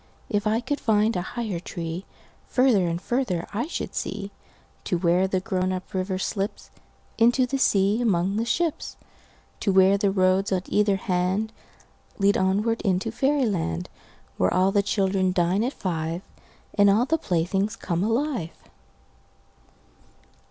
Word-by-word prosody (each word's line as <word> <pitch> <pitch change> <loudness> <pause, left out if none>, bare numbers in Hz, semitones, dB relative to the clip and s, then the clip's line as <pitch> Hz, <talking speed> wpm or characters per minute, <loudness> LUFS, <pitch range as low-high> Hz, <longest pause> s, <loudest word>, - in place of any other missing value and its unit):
If 205 -2 0
I 220 +2 +1
could 290 +4 -2
find 220 0 +2
a 180 - 0
higher 210 -1 -4
treeFarther 185 +5 -1
and 170 +1 -2
farther 205 -5 -1
I 235 +7 -1
should 345 - -5
see, 200 0 -4 0.5
To 180 - 0
where 175 +2 +2
the 190 -1 0
grown 185 -2 -1
up 185 0 -5
river 185 0 -1
slipsInto 230 +5 -1
the 275 +2 -2
sea 200 0 +3
among 195 -3 +1
the 225 - +1
ships. 315 +7 -2 0.6
To 200 - +1
where 190 +1 +5
the 200 - +2
roads 190 0 +2
on 185 -1 0
either 205 -1 +2
handLead 195 +2 -2
onward 205 +5 +1
into 195 +2 0
fairy 270 +3 +1
land, 90 - -2 0.5
Where 90 - +2
all 185 +1 +3
the 200 - +3
children 190 -2 +1
dine 180 +4 +1
at 250 - 0
five, 165 -1 -3 0.5
And 205 -1 +5
all 215 +5 +4
the 320 +4 0
playthings 195 - 0
come 175 0 -2
alive. 230 - -1
195 Hz, 140 wpm, -25 LUFS, 185-225 Hz, 0.6 s, where